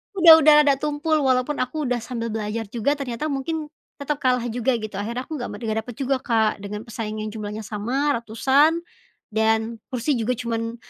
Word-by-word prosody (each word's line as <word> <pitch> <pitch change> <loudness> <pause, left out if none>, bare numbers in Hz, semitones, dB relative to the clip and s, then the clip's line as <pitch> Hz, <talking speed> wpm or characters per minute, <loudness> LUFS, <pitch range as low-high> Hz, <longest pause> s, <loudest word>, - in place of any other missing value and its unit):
udah 330 -3 +9
udah 305 0 +7
udah 285 -2 +4
tumpul 300 +1 0
walaupun 260 +1 +1
aku 275 +5 -2
udah 245 -3 0
sambil 230 -1 -4
belajar 220 +1 -3
juga 245 +5 0
ternyata 275 0 -4
mungkin 305 +2 -3 0.3
tetap 285 +1 -2
kalah 250 -2 +2
juga 245 +2 +1
gitu, 215 -2 -7
akhirnya 235 +5 -3
aku 315 - -5
nggak 245 - -4
met - - -11 0.2
dapet 245 0 -9
juga 270 -1 -1
Kak, 220 -4 +1
dengan 210 +1 -5
pesaing 215 -1 -5
yang 215 - -4
jumlahnya 215 0 -6
sama, 240 +8 -1
ratusan, 270 +8 +3 0.5
dan 220 +1 +1
kursi 255 +3 0
juga 225 +2 0
cuman 230 -1 -3
245 Hz, 180 wpm, -23 LUFS, 220-285 Hz, 0.5 s, udah